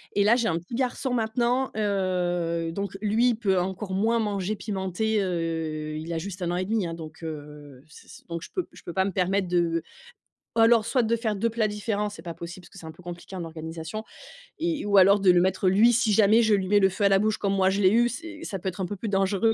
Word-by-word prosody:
Et 200 - +4
là, 225 +3 +5
j'ai 235 -2 +1
un 165 -1 0
petit 180 +8 -8
garçon 255 0 -1
maintenant. 240 +3 0
Heu, 180 -5 -1
donc 200 +2 -4
lui, 220 +4 +3
il 235 - +1
peut 195 -5 +1
encore 190 +2 -4
moins 225 +4 +2
manger 205 -1 -1
pimenté, 205 +1 -1
heu, 160 -4 -2
il 160 +2 -6
a - - -1
juste 185 +2 -6
un 175 0 -1
an 175 - -1
et 185 - -1
demi, 215 -2 0
hein, 165 - -5
donc, 160 0 -10
heu, 150 -3 -8
s 155 - -16
s - - -14
donc 170 0 -4
je - - -9
peux 370 - -2
je - - -16
peux 175 - -7
pas 190 0 +1
me 200 - -1
permettre 190 +1 0
de 170 -2 +1 0.8
alors, 225 -1 +5
soit 245 +1 +1
de 230 +1 +1
faire 220 -2 -1
2 230 +4 0
plats 225 -1 0
différents, 210 0 -2
c'est 185 -5 -10
pas 170 -1 -6
possible 170 +3 -9
parce - - -15
que - - -15
c'est 165 - -11
un 160 - -7
peu 180 - -17
compliqué 175 +2 -8
en 175 - -4
organisation 160 +5 -6 0.5
et 330 -7 -1
ou 205 -1 +3
alors 195 +1 +6
de 185 -2 +6
le 180 - +4
mettre, 190 +1 +2
lui, 220 +6 +5
si 230 -1 +2
jamais 215 +2 +5
je 220 -2 +3
lui 190 -1 -1
mets 205 +1 +4
le 190 - +4
feu 200 +2 -1
à - - +5
la 195 - +4
bouche 215 +1 +1
comme 200 -1 -1
moi 190 -1 +3
je 195 +2 0
l'ai 185 - +6
eu, 240 +2 +4
c'est 325 +4 -8
ça 195 - -4
peut 190 - -6
être 185 +1 -7
un - - 0
peu 205 +3 -5
plus 220 - -5
dangereux, 195 +3 +2
195 Hz, 265 wpm, -26 LUFS, 175-220 Hz, 0.8 s, alors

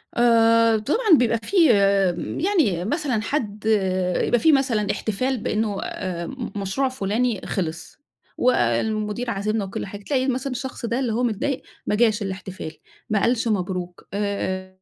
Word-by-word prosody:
آآ 230 -1 +5
طبعًا 330 - +3
بيبقى 230 -2 +2
في 390 - -3 0.9
يعني 215 - +2
مثلًا 255 -4 -1
حد 215 -4 -3 0.6
يبقى 240 - +2
في 320 - +5
مثلًا 235 -7 +2
احتفال 255 +5 -1
بأنه 215 -2 -1
آآ 175 -3 -4 0.3
مشروع 205 +7 -1
فلاني 225 -2 -1
خلص، 165 -4 -4 0.4
والمدير 215 - +1
عازمنا 210 0 -1
وكل 190 - -5
حاجة، 200 +1 -9
تلاقي 260 0 0
مثلًا 260 +1 -1
الشخص 255 -1 -5
ده 235 +3 -1
اللي 240 -5 -1
هو 245 +2 0
متضايق 245 +4 -1 0.2
ما 210 - 0
جاش 220 -2 +2
الاحتفال، 190 -4 -5 0.4
ما 210 -2 +1
قالش 235 -1 +1
مبروك، 180 -3 -3
آآ 190 -2 -2
220 Hz, 140 wpm, -23 LUFS, 200-250 Hz, 0.9 s, آآ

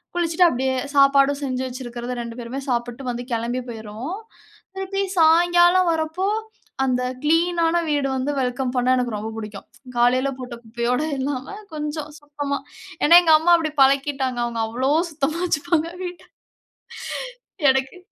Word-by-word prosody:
குளிச்சுட்டு 345 0 +3
அப்டியே 260 0 -1 0.2
சாப்பாடு 275 0 +5
செஞ்சு 260 -1 -2
வைச்சிருக்கறத 245 -1 -6
2 235 +1 -8
பேருமே 245 +4 -5
சாப்ட்டு 245 +1 -2
வந்து 240 +1 -5
கிளம்பி 235 +2 -1
போயிருவோம். 225 - -6 0.6
திருப்பி 390 +1 -2 0.2
சாயங்காலம் 345 +2 +5
வரப்போ 320 +4 -2 0.6
அந்த 250 -1 +1 0.2
கிளீனான 335 +1 +2
வீடு 290 -2 +1
வந்து 260 +3 -1
வெல்கம் 250 0 -2
பண்ண 250 +1 +1
எனக்கு 245 -3 -1
ரொம்ப 220 +2 -5
புடிக்கும். 210 -2 -8 0.3
காலயில 255 +3 +3
போட்ட 250 -1 -7
குப்பையோடு 240 +6 -1
இல்லாம 265 +6 -3 0.2
கொஞ்சம் 300 0 -4
சுத்தமா 290 -1 -4 0.5
ஏன்னா 340 +3 +9
எங்க 320 -2 +5
அம்மா 345 +2 +4
அப்டி 315 -2 -2
பழக்கிட்டாங்க. 270 -2 +2
அவங்க 230 -1 -3
அவ்ளோ 255 +5 -1 0.2
சுத்தமா 310 +3 -2
வச்சுப்பாங்க 335 0 0
வீட்ட. 355 -1 -7 1.5
எனக்கு 265 +6 0
275 Hz, 130 wpm, -22 LUFS, 245-320 Hz, 1.5 s, ஏன்னா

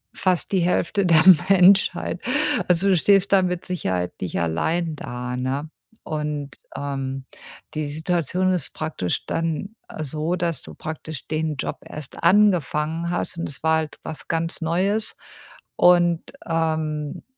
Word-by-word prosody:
fast 185 0 0
die 190 - +2
Hälfte 180 +3 +1
der 165 -3 +6 0.3
Menschheit. 185 -1 +4 0.5
Also, 180 +2 +3
du 185 - +4
stehst 200 +3 +4
dann 190 -2 +5
mit 180 -1 -4
Sicherheit 95 - -2
nicht 90 - -2
allein 160 - 0
da, 125 -1 -5
ne? 135 +4 -2 0.3
Und, 150 -3 -4 0.2
ähm, 135 -1 -4 0.5
die 155 -1 -1
Situation 175 +4 0
ist 175 -7 0
praktisch 155 - -3
dann, 165 +6 -2
äh, 155 - -5
so, 155 +5 -2
dass 170 -2 -1
du - - -12
praktisch 160 -2 -7
den 155 -1 -1
Job 135 - -4
erst 150 +1 -9
angefangen 170 -4 +3
hast. 175 -1 -2
Und 170 - -3
es 140 - -6
war 160 0 +4
halt 155 -1 -4
was 155 - -7
ganz 165 0 -1
Neues 190 +7 0 0.6
und, 175 -1 +5 0.2
ähm, 155 -3 -2
160 Hz, 140 wpm, -23 LUFS, 150-180 Hz, 0.6 s, der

